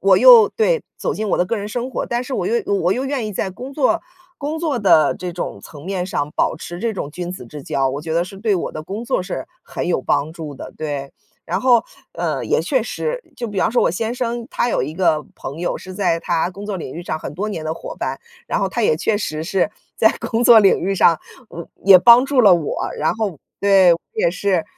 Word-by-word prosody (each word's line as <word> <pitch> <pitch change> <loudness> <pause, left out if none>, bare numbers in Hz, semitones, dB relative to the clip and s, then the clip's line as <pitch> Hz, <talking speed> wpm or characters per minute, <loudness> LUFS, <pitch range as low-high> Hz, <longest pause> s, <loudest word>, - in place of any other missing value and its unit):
我 - - +5
又 485 -3 +9
对， 480 +1 +1
走 - - -2
进 215 0 -3
我 - - +2
的 180 - +3
个 230 +5 -2
人 205 +1 -5
生 245 +3 -4
活， - - -3
但 240 +1 -2
是 265 - -7
我 - - -1
又 460 +1 +1
我 390 - +2
又 255 - -2
愿 270 -4 -2
意 - - -4
在 190 - -2
工 255 +8 -9
作 305 +3 +2 0.4
工 300 +3 -3
作 310 -6 -1
的 175 -8 +4
这 180 -1 -5
种 175 - -5
层 145 -1 -12
面 185 -1 -2
上 145 -5 -2
保 - - 0
持 175 +2 -8
这 225 +3 -2
种 150 -6 -4
君 175 +2 -5
子 180 - -8
之 145 +4 -9
交， 135 -1 0
我 140 +2 -4
觉 160 +1 -4
得 170 +1 +2
是 195 +1 -11
对 210 0 +1
我 175 - -4
的 155 - -6
工 200 +8 -6
作 205 - 0
是 180 - -5 0.2
很 - - -5
有 175 - +1
帮 145 +3 0
助 160 -3 -7
的， - - -9
对。 145 -3 -4 0.3
然 - - -1
后， 240 -3 +4 0.3
呃， - - -2
也 - - +1
确 - - +1
实， - - -3
就 240 - -4
比 205 -4 -3
方 - - +2
说 245 - +2
我 - - +3
先 225 +7 -2
生， 240 -1 -3
他 240 - 0
有 - - 0
一 150 +4 -4
个 160 -4 +2
朋 140 +4 -7
友 175 - -1
是 185 - -10
在 180 -4 0
他 170 0 0
工 195 +3 -9
作 205 -2 -4
领 130 - -7
域 170 - -6
上 155 -2 -3
很 150 - -7
多 205 +6 -3
年 165 -6 -5
的 160 +1 -3
伙 - - -8
伴， - - -3 0.3
然 - - -1
后 195 - +1
他 195 +5 -3
也 155 - +3
确 205 +6 0
实 155 -6 -3
是 190 +3 0 0.2
在 220 - +4
工 230 +1 -1
作 240 -2 +8
领 200 -3 +4
域 195 +2 -1
上 165 -3 +4 0.3
嗯， 170 - -8 0.2
也 190 -1 +9
帮 240 +6 +7
助 275 -2 +2
了 200 -6 +7
我， 165 -4 -2
然 155 - +1
后， 210 -8 -3 0.2
对， 195 -3 +6
我 170 - 0 0.2
也 - - +2
是， 185 -1 0
195 Hz, 270 characters per minute, -20 LUFS, 165-235 Hz, 0.4 s, 又